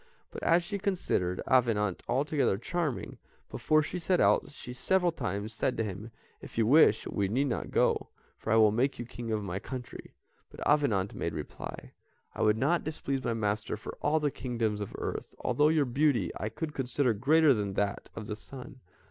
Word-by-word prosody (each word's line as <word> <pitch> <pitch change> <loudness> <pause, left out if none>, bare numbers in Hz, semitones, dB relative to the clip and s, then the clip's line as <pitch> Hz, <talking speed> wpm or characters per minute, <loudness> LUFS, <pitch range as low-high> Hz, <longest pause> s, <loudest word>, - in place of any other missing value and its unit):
But - - -7
as 170 +1 +3
she 200 +4 -4
considered 135 - -1
Avenant 110 -7 +2
altogether 140 -6 +1
charming, 155 - -3 0.3
before 155 0 +2
she 180 +4 -4
set 180 +1 +1
out, - - +3
she 125 -4 -9
several 180 +6 +2
times 100 - -4
said 130 +3 -1
to 115 - +1
him: 105 +2 -6 0.3
"If - - -11
you 115 - +3
wish, 125 -4 +5
we 100 -2 -1
need 125 +8 +1
not 120 - -3
go, - - +1 0.3
for 110 - -3
I - - +5
will 110 -2 +6
make 130 +6 +1
you 120 - -5
king 120 -1 -6
of 105 -1 -1
my 95 -1 -3
country." 125 +2 -8 0.3
But - - -6
Avenant 115 -10 +2
made 85 - -3
reply: 75 -2 -7 0.4
"I - - -5
would 105 0 +4
not 155 +8 +2
displease 140 -4 -3
my 115 - 0
master 105 -1 -1
for - - -8
all 155 - +2
the 150 -2 0
kingdoms 115 -5 -2
of 100 - -6
earth, - - -5
although 150 +1 +3
your 155 -2 +3
beauty 125 - +1
I 105 - -3
consider 135 -1 -1
greater 145 +7 +4
than 100 -4 -2
that 100 0 -1
of 110 - -6
the 105 - -4
sun." 125 +3 -10
120 Hz, 190 wpm, -30 LUFS, 105-150 Hz, 0.4 s, will